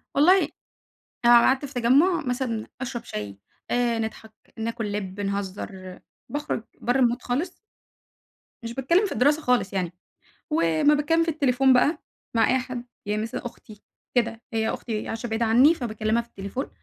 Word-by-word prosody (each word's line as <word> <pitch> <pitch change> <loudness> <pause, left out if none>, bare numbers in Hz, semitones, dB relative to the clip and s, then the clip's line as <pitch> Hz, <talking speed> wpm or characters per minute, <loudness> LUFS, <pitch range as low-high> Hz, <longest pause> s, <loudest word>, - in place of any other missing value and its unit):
والله 350 +7 +6 0.9
أنا 240 - +8
لو - - +6
قعدت 270 +2 +3
في 280 - -10
تجمُّع 285 +9 +3
مثلًا، 245 -3 -2
أشرب 245 -2 -4
شاي 100 -2 -6 0.3
آآ 240 -2 +1
نضحك 220 0 -5 0.2
ناكل 225 -1 -3
لِب 200 -1 -4
نهزّر، 195 -2 -4 0.3
باخرُج 290 -6 -3 0.2
برّه 245 +2 +1
المود 245 0 +2
خالص 315 +9 -2 1.1
مش 230 0 -5
باتكلّم 340 - +2
في 395 - -4
الدراسة 295 +4 +3
خالص 250 -7 +1
يعني، 180 -3 -2 0.6
ولمّا 165 - +3
باتكلّم 325 +3 +2
في 330 - -1
التليفون 270 -3 +3
بقى 285 +6 +3 0.4
مع 225 - +4
أي 260 - +3
حد، 250 -1 -6 0.2
يعني 210 +1 -1
مثلًا 225 +2 -5
أختي 215 -3 -10 0.3
كده، 230 -2 +1
هي 220 0 +1
أختي 220 -3 -4
عايشة 225 +2 -4
بعيد 225 +1 -1
عني 250 +8 +6
فباكلّمها 220 -4 -1
في 235 - -18
التليفون، 200 +5 -5
235 Hz, 155 wpm, -25 LUFS, 215-265 Hz, 1.1 s, أنا